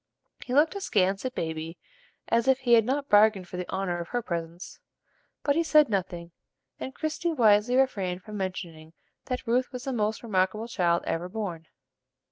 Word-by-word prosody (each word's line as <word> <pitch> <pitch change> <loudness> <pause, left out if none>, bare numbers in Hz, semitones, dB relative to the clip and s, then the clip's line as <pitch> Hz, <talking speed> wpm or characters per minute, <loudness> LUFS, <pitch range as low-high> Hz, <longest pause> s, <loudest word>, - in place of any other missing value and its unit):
He 250 - -3
looked 305 +2 +4
askance 200 - 0
at 255 - -3
Baby, 160 +1 -4 0.5
as 230 +2 +1
if 265 0 +3
he 245 -2 +3
had 225 -2 +6
not 275 +3 -1
bargained 205 -4 +4
for 180 - -7
the 180 - -5
honor 190 -2 -2
of 170 - -5
her 245 +3 -2
presence; 170 -1 -6 0.6
but 285 - +2
he 330 - +3
said 305 -4 +4
nothing, 175 -4 -3 0.5
and 265 - -6
Christie 315 +2 -2
wisely 225 -2 +4
refrained 195 -9 0
from 215 - -9
mentioning 170 -5 -5 0.3
that 250 0 -4
Ruth 250 +2 +1
was 250 -1 -7
the 270 -1 -3
most 215 -1 -1
remarkable 210 +1 0
child 170 -6 +1
ever 175 +2 -2
born. 180 -6 -5
210 Hz, 175 wpm, -27 LUFS, 180-255 Hz, 0.6 s, had